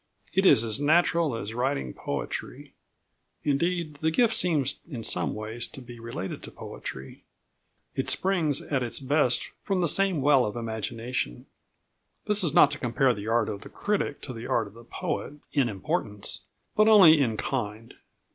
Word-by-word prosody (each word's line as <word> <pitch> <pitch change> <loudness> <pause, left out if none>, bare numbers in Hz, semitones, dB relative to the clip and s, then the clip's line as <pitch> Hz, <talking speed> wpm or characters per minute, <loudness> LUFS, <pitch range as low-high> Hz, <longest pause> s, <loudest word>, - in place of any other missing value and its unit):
It 190 +1 +4
is 115 - +6
as 115 +2 +2
natural 160 -1 +3
as 110 -1 -5
writing 125 - -1
poetry. - - -5 0.7
Indeed, 155 +1 -1
the 160 - +2
gift 225 +7 +3
seems 150 - +1
in 120 -7 -6
some - - 0
ways 110 +2 -2
to - - -10
be 120 -2 -11
related 115 -5 -6
to - - -9
poetry. 65 0 -9 0.7
It - - -2
springs 170 -7 +2
at 135 -3 -1
its 120 -1 -3
best 135 -2 +2
from 195 -3 -1
the 170 - +2
same 185 -3 +2
well 140 -2 +5
of 105 -1 -3
imagination. 115 - -4 0.8
This 210 -2 +2
is 165 - +2
not 145 - +6
to 150 - -5
compare 125 +1 +2
the 105 -1 -7
art 115 +1 +2
of 100 - -5
the - - -11
critic 205 -8 -2
to 130 - -6
the 115 0 -7
art 115 - +1
of 100 - -13
the 115 +1 -14
poet 140 - -4 0.2
in 135 -5 +2
importance, 105 - -3 0.4
but 215 0 +5
only 180 -9 +8
in 115 -5 0
kind. 115 -1 -4
135 Hz, 170 wpm, -27 LUFS, 115-160 Hz, 0.8 s, only